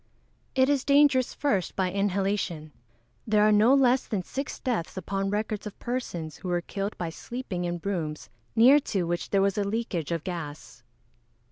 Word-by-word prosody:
_ - - -42 0.5
It 260 0 +4
is 280 -2 +2
dangerous, 280 -3 +4
first, 200 - 0
by 185 -2 0
inhalation. 195 -5 -1 0.6
There 210 -1 +4
are - - +4
no 215 +6 +6
less 260 -1 +3
than 200 -5 -2
six 275 +9 -5
deaths 225 -9 -2
upon 195 +1 -2
record 210 +1 -2
of 205 - -9
persons 175 - -4
who 185 - -8
were 175 -1 0
killed 200 +3 -4
by 170 -2 -3
sleeping 185 0 -5
in 175 0 -2
rooms 160 -9 -3 0.2
near 255 +6 +7
to 200 -9 -2
which 175 0 -2
there 195 -1 +3
was 200 +1 +1
a - - +2
leakage 200 -7 -2
of 165 -2 -2
gas. 145 -9 -7
200 Hz, 175 wpm, -27 LUFS, 175-240 Hz, 0.6 s, near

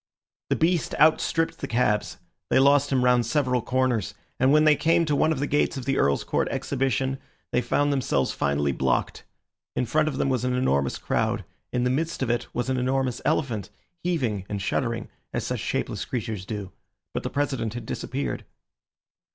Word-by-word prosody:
The - - +3
beast 170 0 +1
outstripped 160 +1 +3
the - - -4
cabs. 105 -3 +1 0.3
They - - +3
lost 140 +1 +5
him 130 -2 +2
round 125 -1 +4
several 125 0 +1
corners, 125 -5 0 0.2
and 130 +1 +4
when 155 +1 +5
they 155 -1 +6
came 165 +3 +3
to 150 -2 +1
one 155 +3 +3
of 155 - -1
the 145 - 0
gates 145 -1 +1
of 130 - -5
the 135 0 +1
Earl's 70 0 +2
Court - - 0
Exhibition 135 0 -1 0.3
they 125 - +2
found 145 +4 +1
themselves 100 - +1
finally 70 0 0
blocked. - - -1 0.5
In 125 - +1
front 155 +6 +2
of 140 -4 -2
them - - +1
was 130 -2 0
an 125 0 0
enormous 70 - +1
crowd; - - -1 0.3
in 125 - 0
the 125 - +2
midst 160 +2 -1
of 120 - +1
it 120 - -1
was 120 0 -2
an 130 0 0
enormous 130 0 0
elephant, 130 -9 0 0.3
heaving 125 - -1
and 105 - -2
shuddering 115 +3 -1 0.3
as - - -2
such - - -2
shapeless - - -2
creatures 110 -6 -4
do. 100 -4 -5 0.4
But - - -2
the - - -3
President 135 -6 -1
had 120 -2 -5
disappeared. 135 +5 -3
130 Hz, 185 wpm, -25 LUFS, 115-145 Hz, 0.5 s, they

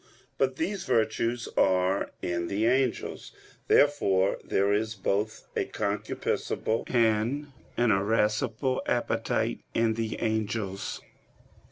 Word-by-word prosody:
But 130 -1 +2
these 190 +7 -2
virtues 115 0 0
are 95 +1 +2
in 85 -1 -1
the 100 +4 0
angels. 125 0 0 0.3
Therefore 100 -10 +3
there 100 +1 +1
is 110 +1 0
both 105 +3 -2
a - - +1
concupiscible 105 +2 -2
and 120 +5 +1 0.3
an 120 -2 +3
irascible 110 +5 +1
appetite - - 0 0.2
in 115 -1 +3
the 110 0 -3
angels. 110 -3 -2
110 Hz, 100 wpm, -28 LUFS, 100-120 Hz, 0.3 s, Therefore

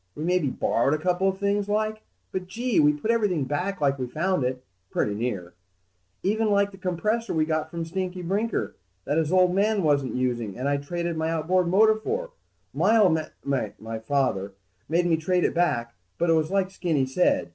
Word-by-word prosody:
We 150 - -5
maybe 175 -4 +1
borrowed 130 +3 +1
a 155 - -6
couple 180 +1 +2
of 190 - -3
things, 200 +1 0
like. 215 +1 0 0.3
But, 185 -1 -4
gee, 235 +4 0
we 150 -1 +6
put 150 +10 -1
everything 205 -10 +1
back 180 +8 -2
like 140 -1 +2
we 125 - -2
found 170 +3 0
it, 125 0 -2 0.3
pretty 105 - 0
near. 100 -6 -3 0.7
Even 215 +2 +1
like 200 0 +2
the 195 - -13
compressor 210 +6 -1
we 155 -1 +2
got 155 0 -1
from 165 0 -4
Stinky 185 +1 -4
Brinker 205 +6 -1 0.3
that 145 - 0
his 160 0 0
old 185 -1 +4
man 205 +1 +2
wasn't 145 -4 +1
using 120 -5 -1
and 130 +3 -2
I 145 - +2
traded 170 +3 -3
my 160 0 0
outboard 170 +3 +1
motor 215 +5 +5
for, 480 - -3 0.4
my 225 - +3
old 190 -7 +5
m... 155 - -4 0.2
my 115 -5 -3
father 110 -6 -1 0.4
made 170 +2 +2
me 165 -2 +3
trade 180 +2 +1
back. 120 -9 0 0.2
But 170 - +1
it - - +6
was 155 -1 +1
like 195 -1 +1
Skinny 165 -8 0
said 130 - +1
170 Hz, 195 wpm, -25 LUFS, 145-195 Hz, 0.7 s, we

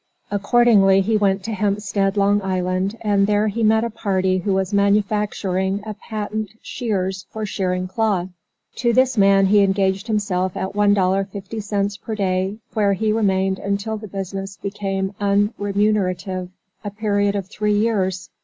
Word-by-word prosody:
Accordingly 205 -2 +4
he 220 +3 0
went 195 -2 +1
to 225 - -4
Hempstead, 200 -1 0
Long 200 +1 +3
Island, 185 +2 -1
and 200 -2 +2
there 210 +1 +2
he 225 +3 -3
met 220 0 +3
a 235 - -2
party 190 -4 0
who 195 +3 -2
was 190 +1 0
manufacturing 200 -1 +1
a 215 - -4
patent 215 0 -5
shears 195 -5 -3
for 220 -1 -4
shearing 185 -2 -2
cloth. 195 -3 0 0.5
To 240 -1 +1
this 260 +1 +3
man 195 -2 +5
he 205 +2 +4
engaged 195 +1 +1
himself 190 -4 -1
at 190 +1 -3
$1.50 200 +1 0
per 220 - -4
day, 190 0 -1 0.2
where 205 -2 +2
he 215 +2 0
remained 190 -3 +1
until 200 +2 -2
the 215 0 -7
business 195 0 -5
became 195 0 -3
unremunerative, 200 -2 0 0.3
a 205 - -3
period 205 -1 0
of 200 -2 -2
three 210 +1 0
years. 195 -4 0
200 Hz, 145 wpm, -21 LUFS, 190-210 Hz, 0.5 s, man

